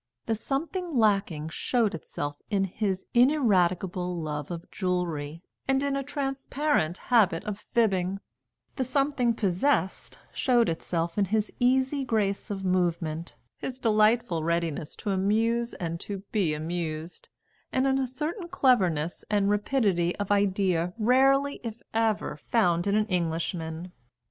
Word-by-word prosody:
The - - 0
something 310 - -2
lacking 195 -8 +2
showed 225 +5 0
itself 145 -3 -5
in 200 -3 +1
his 190 0 -2
ineradicable 185 - +2
love 150 -2 -4
of 170 -1 -5
jewellery 170 -4 -2 0.2
and 270 +1 +2
in 280 -1 0
a 275 - 0
transparent 275 - -1
habit 205 -9 +3
of 210 -1 -4
fibbing; 195 -4 +1 0.6
the 265 - +1
something 265 -1 +1
possessed 195 +1 0 0.2
showed 240 -5 +3
itself 165 +2 -2
in 200 - +4
his 210 +2 -1
easy 265 +3 +2
grace 215 -4 0
of 195 -2 -4
movement, 170 -3 0 0.2
his 255 - -5
delightful 215 -6 +2
readiness 170 -2 -1
to 205 - -3
amuse 225 +5 +1
and 170 -1 -4
to 195 0 -6
be 180 -8 +1
amused, 160 +1 -4 0.4
and 260 +1 +1
in 270 0 +2
a 265 - 0
certain 310 - -4
cleverness 190 - +2
and 205 -1 +2
rapidity 205 -6 +1
of 205 -1 -3
idea 190 -4 +1
rarely, 270 +5 +3
if 230 -1 -5
ever, 225 -7 0
found 175 -6 +2
in 200 - +2
an 215 0 +3
Englishman. 170 -2 -2
200 Hz, 135 wpm, -27 LUFS, 175-245 Hz, 0.6 s, in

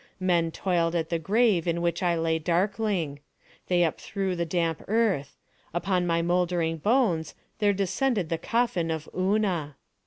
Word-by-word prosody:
Men 175 -3 +2
toiled 170 -1 0
at 160 -1 -1
the 170 - 0
grave 200 0 +2
in 170 0 +1
which 170 -1 -1
I 175 -2 +2
lay 165 0 +1
darkling. 180 -2 0 0.5
They 180 -1 +2
upthrew 190 +3 -2
the 170 -1 -2
damp 165 -2 -1
earth. 200 -10 0 0.4
Upon 180 0 0
my 170 0 +1
mouldering 175 -2 +1
bones 190 - +1 0.2
there 205 -2 +4
descended 200 - 0
the 165 - -1
coffin 230 -7 0
of 160 -1 -3
Una. 185 -6 0
175 Hz, 150 wpm, -27 LUFS, 165-195 Hz, 0.5 s, there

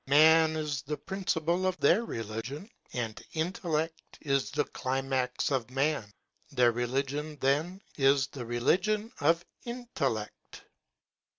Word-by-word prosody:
Man 160 +3 +6
is 150 -3 -2
the 150 0 -4
principle 185 -2 0
of 185 -1 0
their 230 - +4
religion, 115 - -5 0.2
and 115 -3 -3
intellect 160 -1 -2
is 140 -3 +1
the 150 - +1
climax 130 0 -1
of 125 -4 0
man. 135 -5 0 0.4
Their 125 -4 +4
relig 130 +4 -1
ion, 150 +1 -4
then, 155 +9 +1 0.2
is 135 -1 +4
the 135 -1 -7
religion 190 - +1
of 165 +3 +3 0.2
intellect. 200 - -4
145 Hz, 120 wpm, -30 LUFS, 130-165 Hz, 0.4 s, Man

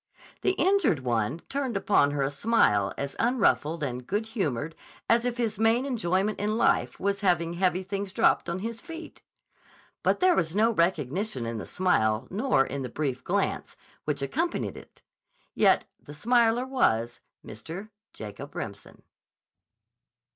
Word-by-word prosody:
The 380 - +2
injured 355 - +2
one 120 +5 -1
turned 270 -6 -2
upon 195 -8 +3
her 145 -1 -1
a 135 - -1
smile 140 - +2
as 140 0 -4
unruffled 195 - +2
and 125 -2 -4
good 210 +3 -1
humored 160 - -2 0.3
as 235 +1 +3
if 245 -1 -1
his 225 -4 -1
main 225 +4 +3
enjoyment 210 -5 0
in 215 +2 0
life - - +2
was 200 +1 -1
having 170 -3 +2
heavy 185 +1 +1
things 195 0 -4
dropped - - +2
on 170 - -2
his 230 0 -5
feet. 330 -1 -9 0.8
But - - +2
there 370 0 +5
was 165 0 0
no 225 +3 +4
recognition 170 - 0
in 115 -1 -3
the - - -7
smile 110 -13 +1
nor 200 - +2
in 140 +1 -4
the 130 - -4
brief 130 -1 -3
glance - - -1 0.3
which 145 -2 -1
accompanied 325 - -1
it. - - -14 0.5
Yet - - +4 0.2
the 145 - -11
smiler 235 +4 +3
was 120 - +1 0.3
Mr. 165 - -8 0.2
Jacob - - -9
Remsen. - - -7
190 Hz, 150 wpm, -27 LUFS, 140-230 Hz, 0.8 s, there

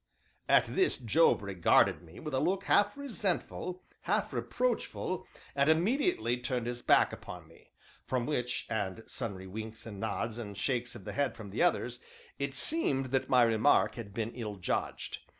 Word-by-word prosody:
At - - +6
this 375 - +1
Job 130 0 +3
regarded 95 -3 +3
me 85 -1 -13
with 150 -2 -6
a 130 - +2
look 195 +5 +1
half 205 +4 +3
resentful, 195 -8 -3 0.2
half - - -1
reproachful, - - -2 0.3
and 140 +1 +3
immediately 200 - +2
turned 125 -1 -2
his 120 0 -3
back - - +4
upon - - -9
me; - - -20 0.4
from 125 -2 0
which, 125 -3 -1
and 105 0 -3
sundry 100 -6 -5
winks 110 +4 -7
and 105 -4 -8
nods 110 +1 -2
and 100 -4 -7
shakes 125 +2 -1
of - - -10
the - - -5
head 140 -3 0
from 105 -4 -9
the 105 - -2
others, 125 -8 +1 0.4
it 140 -1 -2
seemed 135 - +2
that 135 -1 0
my 125 -1 +6
remark 115 +4 +4
had 115 -4 -8
been 110 +2 -3
ill 110 -4 -5
judged. 95 - -3
125 Hz, 170 wpm, -31 LUFS, 110-155 Hz, 0.4 s, At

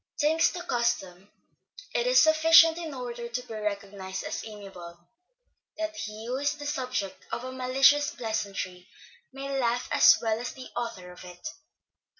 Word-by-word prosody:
Thanks 320 +3 +3
to 350 0 -6
custom, 205 - -2 0.6
it 485 - +1
is - - +6
sufficient 325 +1 +6
in 330 -2 -5
order 240 -3 -6
to 235 +1 -3
be - - -8
recognised 200 -3 -4
as - - -4
amiable, 195 -5 -10 0.8
that 320 0 -3
he 215 -5 -6
who 250 +2 -2
is 285 +2 0
the 290 - -8
subject 255 -9 -3
of 235 +2 -3
a 255 - -5
malicious 270 +3 +4
pleasantry 200 -7 -4 0.4
may 275 0 -4
laugh 240 0 0
as - - +7
well 225 -1 -1
as 245 - -5
the 260 -1 -11
author 230 -7 -5
of 180 - -13
it. 180 - -9
240 Hz, 155 wpm, -28 LUFS, 205-290 Hz, 0.8 s, as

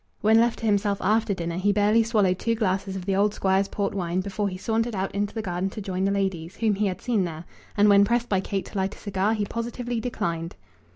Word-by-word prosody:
When 220 +1 +5
left 235 0 +2
to 230 - -5
himself 205 -1 +2
after 215 -1 +1
dinner 170 -1 -3
he 200 +3 +2
barely 210 +2 +3
swallowed 210 -5 +2
two 230 0 0
glasses 195 -2 -1
of 185 -2 -5
the 195 -1 0
old 205 +1 +2
Squire's 195 +1 +2
port 200 0 -2
wine 180 -2 -1
before 200 +1 -2
he 185 - -6
sauntered 225 +3 -1
out 190 0 -2
into 205 +2 -2
the 220 - -3
garden 180 0 -2
to 205 - -8
join 190 -2 -2
the 195 - +2
ladies, 190 -3 -2
whom 220 -2 +2
he 205 +1 0
had 185 - -4
seen 230 -6 +1
there; 165 -1 -5 0.3
and 205 +1 +5
when 200 -1 +7
pressed 235 +3 +1
by 195 -4 +1
Kate 195 0 -3
to - - -8
light 190 +2 -1
a - - -17
cigar 205 +2 0
he 210 -1 -1
positively 235 +2 -3
declined. 170 -8 -3
200 Hz, 245 wpm, -25 LUFS, 190-220 Hz, 0.3 s, when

